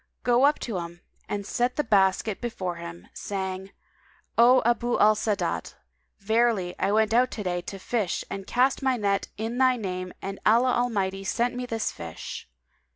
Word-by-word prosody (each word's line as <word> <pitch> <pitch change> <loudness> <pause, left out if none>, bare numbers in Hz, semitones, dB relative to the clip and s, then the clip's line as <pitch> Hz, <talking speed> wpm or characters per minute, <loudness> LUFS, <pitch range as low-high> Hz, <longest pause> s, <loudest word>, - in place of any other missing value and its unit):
Go 245 +2 +4
up 295 - +2
to 215 -7 -3
him 170 0 -8 0.3
and 205 -1 -3
set 245 +4 0
the 295 - +1
basket 200 -1 +2
before 185 -7 -3
him, 170 0 -9
saying,: 190 -1 -4 0.7
'O 245 +2 +6
Abu 240 0 +1
al 215 +1 +6
Sa'adat, 210 -1 -2 0.4
verily 220 -3 +1
I - - +1
went 220 +1 +2
out 250 +2 +4
to 210 - -5
day 175 -1 -1
to 195 - -7
fish 205 -1 -2
and 195 -1 -6
cast 255 +2 +2
my 265 -2 +1
net 200 -2 0
in 225 +3 -3
thy 255 -1 +5
name 185 -4 -4
and 195 0 -6
Allah 240 +4 +4
Almighty 195 -6 0
sent 240 +5 0
me 250 0 -4
this 225 -2 -2
fish.' 80 -6 -8
215 Hz, 170 wpm, -26 LUFS, 190-240 Hz, 0.7 s, O